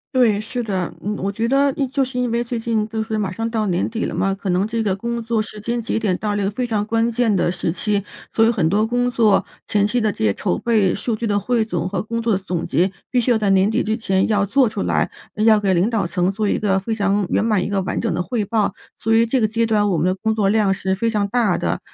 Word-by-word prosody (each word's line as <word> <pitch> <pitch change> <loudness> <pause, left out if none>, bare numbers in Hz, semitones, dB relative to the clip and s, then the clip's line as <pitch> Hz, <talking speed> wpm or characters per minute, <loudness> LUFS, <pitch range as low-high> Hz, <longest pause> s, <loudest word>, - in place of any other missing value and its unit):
对， 220 -5 +3
是 245 +3 -4
的。 190 -6 -2
嗯， 210 +1 -3
我 200 - 0
觉 225 +3 -1
得 275 +2 +3
一 275 -2 0
就 270 +1 0
是 255 -1 -4
因 250 -1 0
为 235 +1 0
最 235 -1 -4
近 225 -2 0
就 220 0 -2
是 220 0 -3
马 195 -3 -1
上 225 +4 -3
到 220 -2 -1
年 180 -1 0
底 225 0 -3
了 - - -2
嘛， 195 0 0
可 195 -1 -5
能 185 +4 +1
这 225 0 -2
个 195 -3 +1
工 235 +3 -3
作 230 -1 0
时 210 -1 -8
间 235 +2 -2
节 225 - -2
点 205 -5 0
到 210 -1 -2
了 205 - -1
一 - - 0
个 200 - 0
非 245 +3 -2
常 210 -2 -1
关 225 +1 +1
键 235 -2 +1
的 180 - +1
时 170 -2 -2
期， 205 +2 -1 0.3
所 225 - +4
以 - - +4
很 185 -9 +1
多 210 +5 +2
工 245 +2 0
作 225 -4 +3 0.2
前 205 -1 +2
期 245 +2 0
的 215 -1 +1
这 - - -14
些 100 - +3
筹 85 - -1
备、 215 -6 +2
数 220 +2 -2
据 230 - -4
的 205 -2 +1
汇 235 +3 +1
总 180 -5 -2
和 185 -1 -2
工 230 +1 -3
作 225 -2 +1
的 - - +2
总 180 -3 -3
结， 180 +3 +1 0.2
必 250 -2 +2
须 245 - +1
要 230 - +4
在 210 -2 0
年 195 +3 +3
底 - - +1
之 220 +1 0
前 190 -4 0
要 205 -2 +2
做 260 +4 +3
出 215 -2 -4
来， - - +1 0.4
要 220 -1 +6
给 195 -2 +2
领 180 +6 +2
导 215 -6 0
层 180 +1 0
做 205 +1 -1
一 - - 0
个 195 -2 +1
非 220 +4 -2
常 200 -1 +1
圆 - - +1
满 210 -5 +2
一 - - -3
个 200 -1 0
完 - - -2
整 - - -1
的 180 - -1
汇 220 +3 -2
报。 205 -1 0 0.2
所 225 +1 +1
以 230 - +5
这 250 +3 +1
个 215 - +3
阶 230 +2 0
段 210 -2 +2
我 175 - +1
们 160 - +1
的 185 - +2
工 220 +3 -1
作 200 -3 +2
量 205 -2 +3
是 190 0 -1
非 230 +4 0
常 210 -2 0
大 220 -5 +2
的， 85 -1 -1
215 Hz, 315 characters per minute, -20 LUFS, 195-230 Hz, 0.4 s, 要